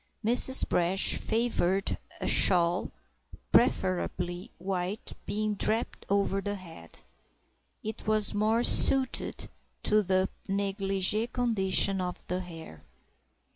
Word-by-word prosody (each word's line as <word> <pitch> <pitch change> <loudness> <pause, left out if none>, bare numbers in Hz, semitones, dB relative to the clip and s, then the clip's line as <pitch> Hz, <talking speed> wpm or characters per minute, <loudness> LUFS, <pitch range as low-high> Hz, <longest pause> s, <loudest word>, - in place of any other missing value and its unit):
Mrs. 250 +3 +6
Brash 180 +3 +1
favoured 220 -5 -1 0.2
a - - -4
shawl—preferably 180 0 -1
white—being 195 +3 -4
draped 220 +3 -1
over 200 0 0
the 205 0 -4
head; 165 - -13 0.8
it 220 0 -7
was 215 -1 +1
more 215 +3 0
suited 265 +1 +2 0.4
to 215 0 +2
the 190 -1 0 0.2
négligé 195 +2 -1
condition 195 -5 +2
of 180 -1 -6
the 180 +1 -3
hair. 165 - -11
195 Hz, 95 wpm, -28 LUFS, 180-215 Hz, 0.8 s, Mrs